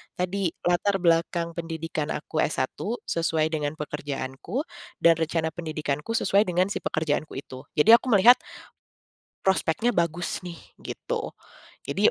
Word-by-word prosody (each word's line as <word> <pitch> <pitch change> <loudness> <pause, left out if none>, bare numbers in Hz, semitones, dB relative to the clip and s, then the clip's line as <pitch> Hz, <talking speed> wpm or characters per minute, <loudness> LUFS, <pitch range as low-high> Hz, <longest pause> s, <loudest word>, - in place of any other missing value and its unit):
tadi 185 +1 -1 0.2
latar 175 +3 +2
belakang 170 0 +2
pendidikan 165 -2 -4
aku 155 +1 -4
S1 130 -4 0 0.3
sesuai 160 -1 0
dengan 150 -1 -2
pekerjaanku 145 - -4 0.4
dan 170 - +8
rencana 160 0 0
pendidikanku 155 +3 -3
sesuai 205 -1 +3
dengan 180 +2 +1
si - - -2
pekerjaanku 155 -1 -2
itu 130 +2 -11
jadi 225 +10 +7
aku - - -10
melihat 240 +6 +8 1.1
prospeknya 190 +4 +2
bagus 170 -3 -1
nih 175 -2 -8 0.2
gitu, 485 -3 -5 0.5
jadi - - +3
165 Hz, 125 wpm, -26 LUFS, 155-185 Hz, 1.1 s, dan